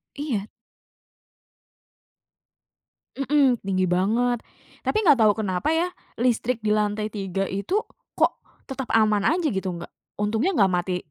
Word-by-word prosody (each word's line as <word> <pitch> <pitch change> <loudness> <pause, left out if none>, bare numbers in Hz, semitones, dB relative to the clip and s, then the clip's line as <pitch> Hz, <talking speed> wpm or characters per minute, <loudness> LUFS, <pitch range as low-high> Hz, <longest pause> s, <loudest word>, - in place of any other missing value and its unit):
Iya. 250 -9 -3 2.7
Mhm, 275 -3 +2
tinggi 185 -1 +1
banget. 225 +7 +1 0.4
Tapi 430 - 0
gak 290 -6 +6
tau 215 - +6
kenapa 200 - -1
ya, 330 +2 +2 0.3
listrik 245 0 +1
di 210 - +1
lantai 210 0 0
3 195 -2 -3
itu 200 - -1 0.4
kok - - +2 0.3
tetap 265 -2 -5
aman 215 -2 +3
aja 330 +1 +2
gitu, 190 -7 -2
nggak 170 - -9 0.3
untungnya 220 - +1
gak 195 -3 +4
mati, 180 0 0
215 Hz, 125 wpm, -24 LUFS, 195-265 Hz, 2.7 s, gak